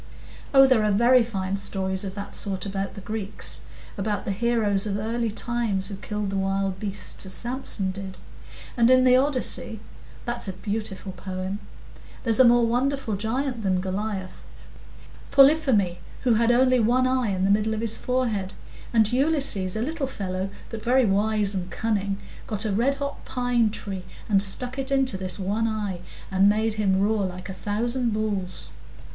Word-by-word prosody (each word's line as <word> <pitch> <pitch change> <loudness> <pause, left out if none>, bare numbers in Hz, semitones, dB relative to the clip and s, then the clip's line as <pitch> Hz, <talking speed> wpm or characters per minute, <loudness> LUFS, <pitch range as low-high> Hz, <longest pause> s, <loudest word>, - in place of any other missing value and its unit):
"Oh, 270 -1 +8
there 255 -5 +3
are 210 - +2
very 240 +5 +5
fine 195 -4 -2
stories 190 -1 -2
of 190 -1 -6
that 200 0 -7
sort 195 -2 -1
about 195 0 -4
the 200 - -8
Greeks,—about 205 0 -4
the - - -1
heroes 215 -2 +1
of 200 -1 -1
early 225 +2 -1
times 220 -3 -1
who 200 - -5
killed 210 0 -4
the 195 - -2
wild 195 0 -1
beasts, 200 -1 -4
as 190 - -4
Samson 240 -6 -1
did. 190 0 -8 0.6
And 235 -1 +4
in 255 0 +6
the 255 0 +6
Odyssey—that's 245 -3 -2
a 190 - -3
beautiful 200 0 -5
poem—there's 190 +5 -4
a - - +9
more 240 0 +5
wonderful 250 -1 0
giant 240 +4 -2
than 190 -3 +1
Goliath,—Polypheme, 205 - 0 0.2
who 250 -3 +3
had 230 +1 +2
only 255 +1 +4
one 245 +3 +3
eye 255 -3 +1
in 190 -1 -1
the 195 - +3
middle 215 +2 +2
of 215 - -3
his 225 -1 +3
forehead; 225 -7 -1 0.4
and 225 -1 +3
Ulysses, 270 - +3
a 220 - -1
little 305 0 -2
fellow, 190 -5 -4 0.2
but 225 -2 -6
very 255 +1 +3
wise 210 0 +1
and 185 -2 -4
cunning, 200 0 -1 0.3
got 215 0 -2
a 215 - 0
red 250 +7 +2
hot 280 0 -5
pine 245 -3 +1
tree 195 -3 -5 0.2
and 200 -3 +3
stuck 250 +7 +1
it 265 0 -2
into 270 -5 +2
this 185 -2 0
one 205 +4 -1
eye, 210 -5 -3 0.3
and 195 +1 +4
made 220 +1 +1
him 195 -3 +1
roar 210 +1 +1
like 185 0 -5
a - - -4
thousand 230 +5 -1
bulls." 200 -4 -3
215 Hz, 165 wpm, -25 LUFS, 195-240 Hz, 0.6 s, a